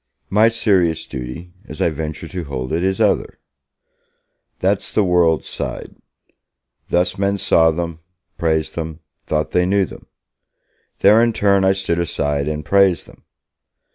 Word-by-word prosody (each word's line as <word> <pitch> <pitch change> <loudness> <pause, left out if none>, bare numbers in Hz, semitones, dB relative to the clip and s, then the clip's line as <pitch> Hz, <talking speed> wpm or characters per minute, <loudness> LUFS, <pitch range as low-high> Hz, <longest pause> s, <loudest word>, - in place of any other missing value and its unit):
My 105 +3 +5
serious 90 -8 +1
duty, 65 +7 -7
as 75 - -9
I 85 - +2
venture 80 +1 -5
to 90 -1 -6
hold 65 0 -5
it, 85 +2 0
is 95 0 0
other; - - +1 1.2
that's - - 0
the 105 - +2
world's 85 -3 +2
side, - - -6 0.9
Thus 90 +1 +1
men 100 0 +1
saw 80 -3 +4
them, 85 0 -3 0.4
praised 80 -2 0
them, 80 -1 -6 0.3
thought 75 0 -1
they 90 0 +2
knew 100 0 +2
them! - - -13 0.9
There, 110 +2 +6
in 115 -1 +2
turn, 100 -2 +2
I 95 0 +4
stood 95 -3 -1
aside 70 -4 -1
and 75 -1 -3
praised 95 -1 +3
them! - - -19
85 Hz, 145 wpm, -19 LUFS, 80-95 Hz, 1.2 s, There